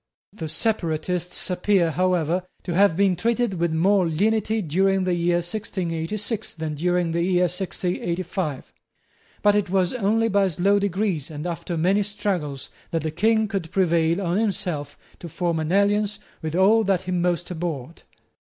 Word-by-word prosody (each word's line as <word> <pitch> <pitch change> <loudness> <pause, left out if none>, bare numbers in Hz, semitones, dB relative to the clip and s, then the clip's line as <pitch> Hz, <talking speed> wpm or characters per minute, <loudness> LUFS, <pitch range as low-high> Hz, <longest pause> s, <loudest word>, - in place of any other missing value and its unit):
The 160 -7 -5
separatists 175 -1 -1
appear, 180 -2 +2
however, 180 0 0 0.2
to 175 - -3
have 190 -2 +4
been 195 -2 +3
treated 230 0 0
with 170 -1 +1
more 185 +3 +3
lenity 215 +6 +1
during 190 +4 +2
the 185 -1 +1
year 175 0 +1
1686 195 +2 -3
than 160 -2 -4
during 175 +2 0
the 170 +1 0
year 180 0 +2
1685. 180 -3 -2 0.7
But 205 0 +5
it 205 -3 +1
was 185 -1 +1
only 225 -1 +1
by 200 -2 +3
slow 190 +4 +2
degrees 195 -6 -1
and 150 0 -6
after 175 0 -3
many 190 +5 +2
struggles 195 -9 -3 0.2
that 165 -2 -2
the 155 - -2
King 220 +6 +2
could 195 -6 -3
prevail 170 -2 +2
on 175 +2 0
himself 190 -9 -2 0.2
to 170 - -8
form 170 0 -1
an 155 +1 -2
alliance 205 +1 +2 0.2
with 160 0 -3
all 210 +5 +5
that 195 -3 +1
he 185 - -4
most 175 0 0
abhorred. 165 -3 -5
180 Hz, 155 wpm, -24 LUFS, 165-200 Hz, 0.7 s, But